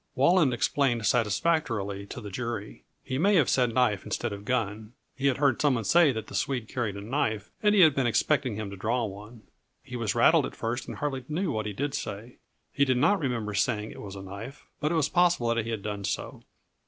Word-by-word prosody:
Walland 150 +1 +4
explained 120 -1 +1
satisfactorily 105 - 0
to - - -7
the 105 -2 -8
jury. 115 -1 -5 0.2
He 130 - -3
may 200 +5 +4
have 155 -8 +4
said 125 -3 +2
knife 115 -5 +1
instead - - -3
of 100 0 -9
gun. 110 -2 -2 0.2
He 140 0 0
had 135 - +2
heard 140 -4 +2
some 145 -3 +3
one 115 - -2
say 165 - +5
that 110 -3 -4
the - - -13
Swede 125 -5 -1
carried 115 -6 -3
a - - -6
knife, 110 -3 -2
and 210 0 +4
he 200 - +6
had 160 -4 +7
been 135 -3 +1
expecting 130 0 +1
him 105 -2 -5
to - - -6
draw 115 +5 -1
one. 105 +3 -10 0.4
He 125 - -9
was 115 -4 -1
rattled - - +5
at - - -11
first 120 +2 -3
and - - -6
hardly 135 -3 -3
knew 170 +3 -1
what 110 -1 -2
he 105 - -4
did 140 +6 -3
say. 110 +2 -6 0.4
He 140 - +2
did 130 -2 +2
not 190 +10 +3
remember 120 -8 -2
saying 105 +1 0
it - - -10
was 100 -1 -8
a 95 - -8
knife, 105 +9 -9
but 150 +1 0
it - - +1
was 155 -3 +2
possible 175 -10 +2
that 115 -1 0
he - - -5
had 110 -3 -3
done 105 -1 -4
so. 95 - -4
120 Hz, 230 wpm, -27 LUFS, 105-140 Hz, 0.4 s, had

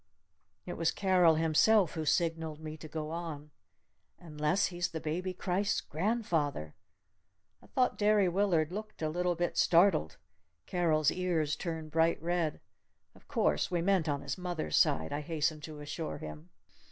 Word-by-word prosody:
It 175 - -6
was 165 - +2
Carol 180 -4 +4
himself 165 +4 +3
who 160 -2 -3
signaled 160 -1 0
me 155 -1 -7
to 155 0 -10
go 155 0 -5
on. 160 -3 -6 0.7
"Unless 150 +2 0
he's 175 -1 -1
the 165 - -5
Baby 170 +5 -3
Christ's 190 +2 -1
grandfather?" 160 - -1 0.9
I - - -18
thought 255 -1 0
Derry 210 -2 +4
Willard 175 -4 +1
looked 215 -2 -7
a 155 - +1
little 175 +2 0
bit 175 +1 -1
startled. 170 - +4 0.5
Carol's 160 -4 +2
ears 170 -5 0
turned 160 -3 -5
bright 165 +1 +2
red. 170 -2 -1 0.5
"Oh, - - -19
of - - -23
course 75 0 +1
we 175 -2 -1
meant 185 -4 +2
on 140 -1 -1
his 140 +4 -4
mother's 175 - -3
side!" 80 0 +2
I 145 - -2
hastened 155 0 -1
to 155 -2 -9
assure 150 +2 -5
him. 75 +2 -9
165 Hz, 155 wpm, -31 LUFS, 155-180 Hz, 0.9 s, Carol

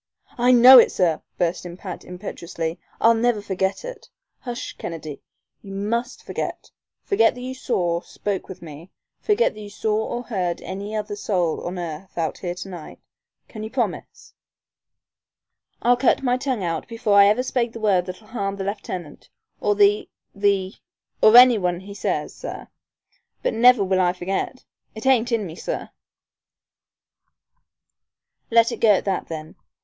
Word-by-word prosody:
"I 245 +1 +5
know 250 +1 +10
it, - - +5
sir," 170 -4 +1 0.2
burst 175 0 0
in 175 0 -8
Pat, 185 -1 -7
impetuously. 170 -2 -6 0.2
"I'll 230 - +6
never 230 -1 +1
forget 190 - -2
it - - -9 0.2
" - - -56
"Hush, 245 -1 -6
Kennedy, 155 -4 -6 0.4
you 195 -1 -9
must 235 +5 -2
forget - - -5 0.3
forget 245 - +3
that 250 - -9
you 255 +1 -5
saw 175 -10 -1
spoke 200 0 -4
with 190 -1 -9
me 160 +2 -11 0.3
forget 440 +3 +2
that 215 - -11
you 205 - -8
saw 210 +1 -1
or 240 +2 -4
heard 185 -8 -2
any 200 +3 -6
other 210 -1 -3
soul 180 -5 -1
on 180 +1 -5
earth 175 +1 -7
out 165 -2 -2
here 175 -2 -4
to 180 - -7
night. 175 -5 -9 0.5
Can 215 - -9
you 220 - -5
promise?" 270 - -4 1.5
"I'll 245 +1 +5
cut 265 +1 +2
my 250 -1 +2
tongue 255 -5 -2
out 165 -2 -3
before 230 -2 -1
I 200 0 +8
ever 215 +5 +2
spake 245 -2 -1
the 230 - -8
word 195 -4 +2
that'll 185 +4 -8
harm 200 -4 -3
the 195 - -5
lieutenant, 185 -6 -6 0.3
or 205 - +1
the 205 +1 +3 0.2
the 200 -1 +1 0.5
or 220 +2 +8
any 245 -3 +8
one 180 -1 -1
he 200 +1 -10
says, 200 - -2
sir. - - -8 0.7
But - - 0
never 240 -1 +6
will 190 -1 +1
I 175 -1 +2
forget! 190 +8 -4 0.3
It 220 - -8
ain't 250 -2 +3
in 225 -3 0
me, 165 -3 -8
sir." - - -5 2.6
"Let 230 0 +4
it - - -5
go 220 -2 +6
at 190 - 0
that 195 -2 -1
then. 155 0 -7
205 Hz, 165 wpm, -23 LUFS, 180-235 Hz, 2.6 s, know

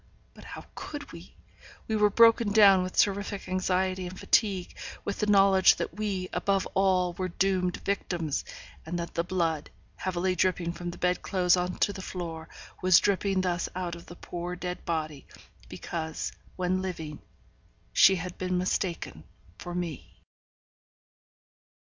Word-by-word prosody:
But - - -14
how - - -9
could 290 -1 -7
we? 170 +2 -12 0.5
we 220 - 0
were 210 -1 +4
broken 230 0 +5
down 200 -3 +7
with 185 0 -5
terrific 200 0 +1
anxiety 185 0 0
and 185 +1 -9
fatigue, 195 -5 +1 0.3
with 200 - -3
the 210 - 0
knowledge 195 -2 +6
that - - -4
we, 195 -2 -2
above 195 +2 +1
all, 185 -2 +2
were 185 +1 -3
doomed 185 0 0
victims; 175 -6 -1 0.4
and 170 +2 -4
that 170 0 -5
the 170 - 0
blood, 165 -4 -1 0.3
heavily 185 0 -1
dripping 180 -1 +1
from 175 0 -5
the 175 - -8
bed 180 0 0
clothes 180 -2 +3
on 180 0 -2
to 200 - +1
the 190 - -7
floor, 165 -3 -6 0.3
was 185 -2 +6
dripping 195 -1 +2
thus 180 -1 -1
out 180 -2 -3
of 170 0 -10
the 175 - -10
poor 175 0 -5
dead 180 0 -5
body, 155 -4 -3 0.4
because, 160 -1 -4 0.2
when 185 0 0
living, 160 -5 -5 0.7
she 195 - +7
had 180 0 -6
been 185 0 -1
mistaken 180 - -2 0.4
for 175 0 -6
me. 175 -4 -5
185 Hz, 150 wpm, -28 LUFS, 175-190 Hz, 0.7 s, down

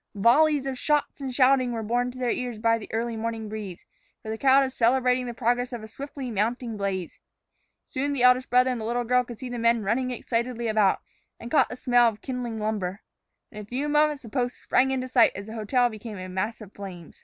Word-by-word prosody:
Volleys 280 +7 +4
of 265 -2 -4
shots 295 -1 0
and 265 -1 -3
shouting 255 -1 +3
were 225 -1 -3
borne 245 +3 0
to 250 - -10
their 250 -2 0
ears 245 -3 -3
by 230 +1 +2
the 210 - -10
early 230 +1 -2
morning 225 0 -4
breeze, 205 -4 -7 0.4
for 220 - -5
the 220 - -3
crowd 275 0 +5
was 260 -1 -3
celebrating 250 +1 +2
the 240 - -4
progress 245 +1 0
of 240 -3 -6
a - - -8
swiftly 270 +2 -7
mounting 230 +2 -1
blaze. 195 -3 -3 0.7
Soon 285 +1 -2
the 275 -3 0
eldest 250 +1 +5
brother 250 +1 +4
and 245 -3 -3
the - - -4
little 240 +2 -1
girl 250 +1 +2
could 240 -2 -9
see 255 - -7
the 245 -1 -5
men 230 -1 +2
running 245 +6 0
excitedly 235 -1 -2
about, 215 -3 +2 0.4
and 235 - -8
caught 305 - +4
the - - -6
smell 245 -1 +4
of 215 -1 -9
kindling 250 -4 -4
lumber. 210 -3 -2 0.5
In 210 - -8
a - - -10
few 255 +7 -3
moments 300 -1 +2
the 230 - -9
post 245 0 -2
sprang 265 +1 +2
into 260 -1 -1
sight 245 -3 +4
as 200 - -6
the 220 - -9
hotel 245 +3 +2
became 215 -2 -8
a 185 0 -6
mass 190 +5 -3
of 210 -2 -11
flame. 180 -5 -9
240 Hz, 230 wpm, -26 LUFS, 220-255 Hz, 0.7 s, crowd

